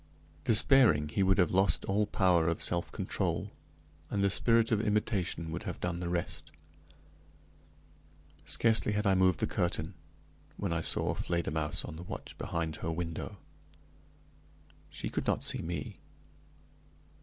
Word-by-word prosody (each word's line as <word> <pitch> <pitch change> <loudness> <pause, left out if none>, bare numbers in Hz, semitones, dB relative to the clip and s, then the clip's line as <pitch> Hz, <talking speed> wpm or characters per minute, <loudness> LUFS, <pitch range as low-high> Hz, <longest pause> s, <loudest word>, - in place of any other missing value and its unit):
Despairing, 110 - +5
he 85 - -1
would 95 0 +4
have 90 - +3
lost 95 +2 +3
all 105 +2 +1
power 90 -5 +3
of 85 -1 0
self 85 0 0
control, - - -2 0.6
and 100 -1 0
the 100 - +3
spirit 115 +2 +3
of 105 -2 +3
imitation 100 -6 -1
would - - -4
have - - -5
done 85 -1 -2
the 90 -1 -3
rest. 85 -1 -3 1.9
Scarcely 110 -2 +2
had 105 +1 -1
I 100 - +4
moved 95 -2 +3
the - - +3
curtain, 85 0 -2 0.6
when 100 -4 -2
I 85 - 0
saw - - 0
Fledermausse 80 -3 -1
on 80 - -8
the 85 - -7
watch - - -7
behind 80 -2 -3
her 80 - -4
window. 80 0 -4 1.5
She - - -5
could - - -3
not - - +1
see - - +1
me. 85 +1 -5
90 Hz, 145 wpm, -31 LUFS, 85-100 Hz, 1.9 s, Despairing